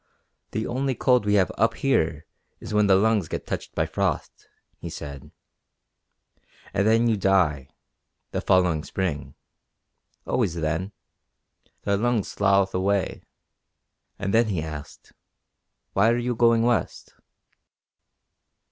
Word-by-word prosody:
"The 110 Hz, -, -3 dB
only 130 Hz, +2 st, -1 dB
cold 125 Hz, -5 st, +2 dB
we 105 Hz, -, +3 dB
have 95 Hz, -2 st, +3 dB
up 115 Hz, -, +3 dB
here 80 Hz, -, 0 dB, 0.3 s
is -, -, -7 dB
when 105 Hz, -1 st, +3 dB
the 95 Hz, -, +6 dB
lungs 105 Hz, -2 st, +2 dB
get -, -, -5 dB
touched -, -, -5 dB
by -, -, +1 dB
frost," -, -, -3 dB, 0.3 s
he -, -, -6 dB
said, 70 Hz, -2 st, -8 dB, 1.4 s
"and 100 Hz, +1 st, +1 dB
then 115 Hz, +1 st, +4 dB
you 115 Hz, -, +3 dB
die 90 Hz, -9 st, +2 dB, 0.6 s
the -, -, -2 dB
following 90 Hz, -5 st, +2 dB
spring. 75 Hz, -9 st, -3 dB, 0.9 s
Always 85 Hz, -, 0 dB
then. 85 Hz, +4 st, -2 dB, 0.9 s
The 100 Hz, -1 st, +1 dB
lungs 120 Hz, 0 st, 0 dB
slough 100 Hz, -1 st, +2 dB
away." 95 Hz, 0 st, 0 dB, 1.0 s
And 100 Hz, 0 st, -3 dB
then 115 Hz, 0 st, +4 dB
he 90 Hz, -7 st, -2 dB
asked: 75 Hz, -2 st, -9 dB, 0.8 s
"Why 100 Hz, +3 st, +4 dB
are 120 Hz, -, +2 dB
you 120 Hz, 0 st, -1 dB
going 115 Hz, -1 st, +3 dB
west?" 120 Hz, -1 st, -1 dB
100 Hz, 125 wpm, -25 LUFS, 85-115 Hz, 1.4 s, the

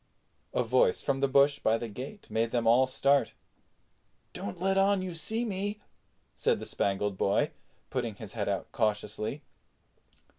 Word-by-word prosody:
A -, -, +1 dB
voice 475 Hz, -2 st, +2 dB
from 135 Hz, -, 0 dB
the 140 Hz, -, +3 dB
bush 140 Hz, +1 st, +4 dB
by 110 Hz, +1 st, +2 dB
the 115 Hz, -, -5 dB
gate 130 Hz, -, -8 dB
made 115 Hz, +1 st, +1 dB
them 120 Hz, -1 st, 0 dB
all 120 Hz, +3 st, +5 dB
start. 140 Hz, +2 st, +2 dB, 1.0 s
"Don't 100 Hz, -, -6 dB
let 190 Hz, +2 st, +1 dB
on 195 Hz, 0 st, +3 dB
you 185 Hz, -2 st, -4 dB
see 220 Hz, +9 st, -1 dB
me," 205 Hz, 0 st, -3 dB, 0.6 s
said -, -, +1 dB
the -, -, -6 dB
Spangled 100 Hz, 0 st, -1 dB
Boy, 100 Hz, -, +2 dB, 0.4 s
putting 120 Hz, -5 st, -2 dB
his 105 Hz, 0 st, -9 dB
head 105 Hz, -3 st, -2 dB
out 100 Hz, -2 st, -3 dB
cautiously. 110 Hz, +3 st, -1 dB
130 Hz, 155 wpm, -30 LUFS, -, 1.0 s, all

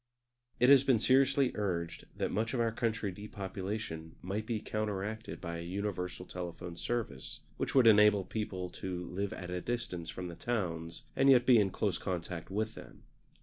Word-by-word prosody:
It 125 Hz, +2 st, +6 dB
has 140 Hz, -1 st, +8 dB
been 130 Hz, -4 st, +4 dB
seriously 135 Hz, +3 st, +4 dB
urged 85 Hz, -5 st, -2 dB
that -, -, -1 dB
much 115 Hz, +4 st, 0 dB
of -, -, 0 dB
our 115 Hz, -1 st, +2 dB
country 115 Hz, -3 st, -1 dB
depopulation 95 Hz, -4 st, -5 dB
might 105 Hz, +4 st, -3 dB
be 115 Hz, -3 st, -1 dB
counteracted 110 Hz, +1 st, -3 dB
by 85 Hz, -2 st, -4 dB
a -, -, -5 dB
universal 90 Hz, 0 st, -3 dB
telephone 90 Hz, -1 st, -6 dB
service, 90 Hz, -, -3 dB, 0.2 s
which -, -, -2 dB
would 130 Hz, -3 st, +7 dB
enable 105 Hz, -3 st, +7 dB
people 95 Hz, -3 st, -4 dB
to 90 Hz, -1 st, -4 dB
live 100 Hz, +2 st, -2 dB
at 90 Hz, -1 st, -6 dB
a 90 Hz, 0 st, -2 dB
distance 105 Hz, -9 st, -3 dB
from 90 Hz, +1 st, -5 dB
the 85 Hz, -, -7 dB
towns 85 Hz, -4 st, -3 dB
and 135 Hz, -, +5 dB
yet 125 Hz, -2 st, +7 dB
be 125 Hz, -3 st, +7 dB
in 100 Hz, -2 st, +3 dB
close 95 Hz, -1 st, -1 dB
contact 85 Hz, -2 st, -4 dB
with 110 Hz, +3 st, -1 dB
them. -, -, -12 dB
100 Hz, 175 wpm, -33 LUFS, 90-115 Hz, 0.2 s, has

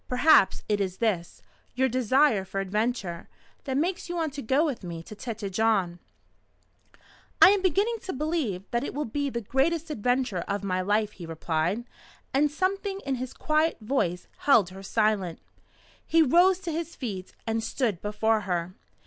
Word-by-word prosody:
Perhaps 250 Hz, -4 st, +4 dB
it 205 Hz, -1 st, +1 dB
is 190 Hz, -1 st, -2 dB
this 195 Hz, -7 st, -2 dB, 0.3 s
your 260 Hz, +1 st, +3 dB
desire 255 Hz, -2 st, +3 dB
for 195 Hz, +1 st, -4 dB
adventure 195 Hz, -3 st, -2 dB, 0.4 s
that 265 Hz, -2 st, -1 dB
makes 345 Hz, +4 st, -1 dB
you 350 Hz, -, -3 dB
want 320 Hz, -4 st, -1 dB
to 285 Hz, -, -5 dB
go 270 Hz, +7 st, +2 dB
with 270 Hz, -9 st, -3 dB
me 170 Hz, -2 st, -6 dB
to 215 Hz, -, -10 dB
Tête 225 Hz, -1 st, -5 dB
Jaune?" 195 Hz, -4 st, +1 dB, 1.4 s
"I -, -, +9 dB
am 405 Hz, -1 st, +2 dB
beginning 400 Hz, +6 st, +1 dB
to 375 Hz, -, -3 dB
believe 285 Hz, -, -2 dB
that 235 Hz, +2 st, 0 dB
it -, -, -5 dB
will 300 Hz, -, -1 dB
be 285 Hz, +5 st, -2 dB
the 235 Hz, -2 st, -3 dB
greatest 305 Hz, +8 st, 0 dB
adventure 245 Hz, -, 0 dB
of 200 Hz, 0 st, -2 dB
my 185 Hz, -1 st, 0 dB
life," 210 Hz, +2 st, +1 dB
he 175 Hz, -5 st, -10 dB
replied, 165 Hz, +6 st, -1 dB, 0.5 s
and 290 Hz, +2 st, +3 dB
something 390 Hz, +5 st, -1 dB
in 275 Hz, -, -1 dB
his 255 Hz, -, -4 dB
quiet 310 Hz, +1 st, +1 dB
voice 210 Hz, -7 st, -1 dB
held 230 Hz, -10 st, +4 dB
her 190 Hz, +1 st, -10 dB
silent. 200 Hz, -4 st, 0 dB, 0.7 s
He 325 Hz, 0 st, +4 dB
rose 350 Hz, +6 st, +5 dB
to 350 Hz, -3 st, -4 dB
his 330 Hz, +1 st, -4 dB
feet, 195 Hz, -8 st, -6 dB
and 225 Hz, 0 st, -1 dB
stood 220 Hz, -8 st, -1 dB
before 215 Hz, +1 st, +1 dB
her. 175 Hz, 0 st, -1 dB
230 Hz, 170 wpm, -27 LUFS, 195-300 Hz, 1.4 s, I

